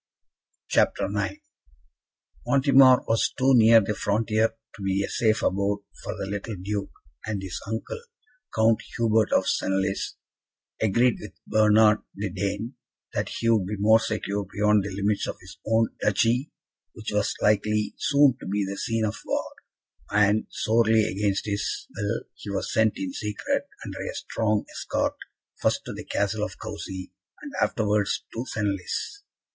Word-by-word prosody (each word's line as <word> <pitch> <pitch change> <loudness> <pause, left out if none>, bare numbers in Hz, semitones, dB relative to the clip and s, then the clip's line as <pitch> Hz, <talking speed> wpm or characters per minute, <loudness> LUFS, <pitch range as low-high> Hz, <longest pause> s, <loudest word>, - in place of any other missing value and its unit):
CHAPTER - - +2
IX 305 - -2 1.1
Montemar 135 -2 +6
was 115 0 +2
too 135 0 +4
near 115 -1 +7
the 105 +1 -1
frontier 110 +2 +1 0.2
to 105 - -12
be 95 0 0
a - - -2
safe 110 -1 +1
abode 100 +1 0 0.2
for - - -5
the - - -3
little 100 +2 -4
Duke, 100 +2 -3 0.4
and 110 -2 -2
his 95 -2 -5
uncle, 110 - -4 0.5
Count 110 0 +3 0.2
Hubert 110 -2 +2
of 95 - +3
Senlis, 95 0 0 0.7
agreed 115 +4 +3
with 105 - -9
Bernard 110 0 +5 0.2
the 100 -1 -3
Dane 100 +6 -3 0.4
that - - -1
he 115 - -1
would 105 -5 +3
be 105 +1 -3
more 110 +3 +5
secure 105 -2 -2
beyond 105 -1 +3
the 100 - -4
limits 100 +2 0
of - - -4
his 95 +1 -13
own 115 0 +3
duchy, 115 +7 +2 0.4
which 110 -1 -6
was 105 +1 0
likely 105 0 +2
soon 140 -3 +4
to - - -8
be 100 +1 0
the 100 +1 -5
scene 115 -1 0
of 105 +1 -3
war; - - -2 0.6
and, 105 +1 +3
sorely 110 0 +3
against 100 0 -1
his 100 -1 -2
will, 105 +3 -2
he 105 - -10
was 100 -1 -3
sent 110 -1 +3
in 95 -2 -4
secret, 105 -1 -2 0.2
under - - -7
a - - -5
strong 110 -2 -1
escort, - - -1 0.5
first - - +1
to - - -5
the - - -8
Castle 100 +1 -1
of 105 - -5
Coucy, 100 -4 -7 0.3
and 290 - -7
afterwards 105 -2 +1
to 115 - -3
Senlis. 105 - -3
105 Hz, 155 wpm, -26 LUFS, 100-110 Hz, 1.1 s, near